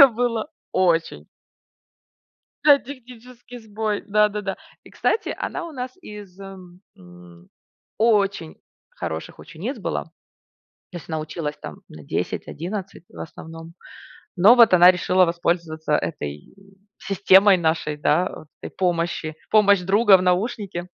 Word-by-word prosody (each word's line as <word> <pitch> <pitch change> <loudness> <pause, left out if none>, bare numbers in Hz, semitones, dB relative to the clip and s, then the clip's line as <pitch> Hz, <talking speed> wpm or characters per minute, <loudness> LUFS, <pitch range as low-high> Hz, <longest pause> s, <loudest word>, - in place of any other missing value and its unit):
Это 280 - +12
было 230 -2 -2 0.2
очень. 170 -3 0 1.4
Да, 290 -2 +7
технический 245 -2 -12
сбой. 215 -1 -4
Да-да-да. 210 -1 0 0.3
И, - - -16
кстати, 440 - -1
она 360 - -4
у - - -10
нас 255 -3 -6
из 205 - -12
э, - - -9 0.5
м, 90 -1 -17 0.5
очень 200 -7 +1 0.3
хороших - - -7
учениц - - -7
была. - - -3 0.9
То 180 - -7
есть 170 - -12
она 160 -1 -3
училась 155 -1 -5
там - - -9
на 75 - -13
10-11, 185 - -5
в - - -14
основном. 165 +1 -10 0.6
Но 200 +7 +7
вот 235 -5 +6
она 180 0 +8
решила 185 0 +2
воспользоваться 170 -2 -2
этой 75 - -4 0.4
системой 195 0 +4
нашей, 160 -3 -1
да, 155 +5 +1
вот 155 - -12
этой - - -9
помощи. 170 -3 -2
Помощь 200 -3 +4
друга 200 +2 +5
в 185 - -3
наушнике. 185 -1 -2
185 Hz, 125 wpm, -22 LUFS, 165-215 Hz, 1.4 s, Это